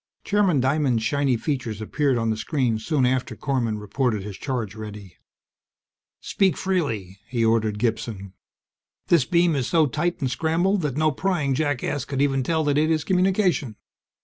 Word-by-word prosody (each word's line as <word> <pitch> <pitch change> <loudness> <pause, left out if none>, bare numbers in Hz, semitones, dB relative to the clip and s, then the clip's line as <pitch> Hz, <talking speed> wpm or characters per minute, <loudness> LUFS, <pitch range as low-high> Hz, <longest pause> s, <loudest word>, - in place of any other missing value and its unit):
Chairman 200 -8 +2
Diamond's 130 -3 +1
shiny 140 -1 +1
features 120 -5 -3
appeared 135 +4 0
on 115 -1 0
the - - 0
screen 115 0 -1
soon 135 +3 +1
after 130 0 0
Korman 120 -6 -1
reported 105 0 -1
his 100 -1 -7
charge 120 -7 -3
ready. 105 -4 -9 1.0
"Speak 190 -6 +1
freely," 115 - -2
he 120 -1 0
ordered 110 -2 +1
Gibson. 105 -4 -3 0.8
"This 165 -7 +4
beam 170 +1 +2
is 130 -3 -1
so 160 -2 +3
tight 170 +6 -1
and 130 -4 -1
scrambled 175 +7 +1
that 145 -4 -2
no 155 0 +3
prying 155 -3 0
jackass 145 -1 -1
could 140 -2 -4
even 135 -1 +2
tell 160 +4 0
that 145 -1 +2
it 155 +1 +2
is 155 -2 +1
communication. 185 - +1
135 Hz, 160 wpm, -24 LUFS, 115-155 Hz, 1.0 s, This